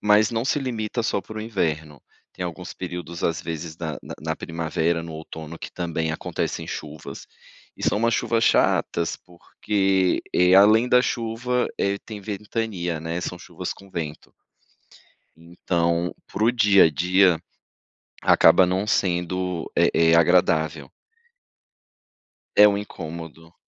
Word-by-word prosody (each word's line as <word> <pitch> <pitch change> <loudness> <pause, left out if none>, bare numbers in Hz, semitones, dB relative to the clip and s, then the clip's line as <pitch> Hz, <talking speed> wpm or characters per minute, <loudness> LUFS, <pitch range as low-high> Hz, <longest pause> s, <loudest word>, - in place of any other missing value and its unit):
mas 105 +1 +4
não 115 +1 -1
se 145 +2 0
limita 115 -2 -3
só 105 - 0
pro 110 +4 -8
inverno. 80 -9 -3 0.3
Tem 90 - -6
alguns 90 +1 -6
períodos 90 -2 -6
às 80 +1 0
vezes 80 -1 -6
na 80 -3 -5
na - - -8
na 80 0 -2
primavera, 85 0 -1
no 85 -1 -8
outono, 80 +1 -8
que - - -8
também 80 -2 -2
acontecem 80 0 -3
chuvas. 75 -2 -7 0.5
E - - -11
são - - +1
umas 115 +1 +2
chuvas 115 -1 +1
chatas 85 -1 +2
porque, 95 +1 -1
eh, 90 +1 +4
além 110 +5 +6
da 125 0 +5
chuva, 120 +1 -1
eh, 100 0 0
tem 105 -2 -8
ventania, 100 -4 -3
né, 80 +2 -3
são 90 - -4
chuvas - - -6
com 100 -1 -17
vento. 80 -4 -6 1.0
Então, 85 +1 -1
pro 115 +3 +1
dia 105 -5 +5
a - - +4
dia, 90 +3 +3 0.8
acaba 95 - +6
não 95 +3 -1
sendo 90 -2 -1
eh - - +4
eh, 80 0 +4
agradável. 85 -2 +2 1.7
É 105 - +9
um 100 -1 +1
incômodo. 80 -4 -8
90 Hz, 135 wpm, -23 LUFS, 80-105 Hz, 1.7 s, É